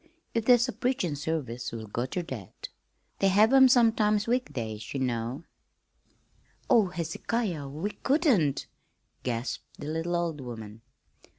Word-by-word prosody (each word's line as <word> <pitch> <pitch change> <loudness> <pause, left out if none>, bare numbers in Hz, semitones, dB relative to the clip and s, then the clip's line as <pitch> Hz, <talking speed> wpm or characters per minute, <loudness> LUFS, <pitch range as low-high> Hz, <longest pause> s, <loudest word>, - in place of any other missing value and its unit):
If 230 -1 0
there's 245 0 +5
a 250 - -3
preachin' 245 - -1
service 140 -6 -3
we'll 115 -1 -6
go 120 +4 -3
ter 175 +6 -3
that. 120 - -8 0.5
They 195 - +3
have 210 +6 +5
'em 265 -1 +8
sometimes 220 -4 +4
weekdays, 115 - -3
ye - - 0
know." 125 +3 -2 1.2
"Oh, 230 -6 +5
Hezekiah, 175 - -3
we 160 +9 -3
couldn't!" 260 - +2 0.6
gasped 120 0 -4
the - - -8
little 165 +3 -2
old 170 -4 -1
woman. 110 -3 -8
165 Hz, 130 wpm, -28 LUFS, -, 1.2 s, em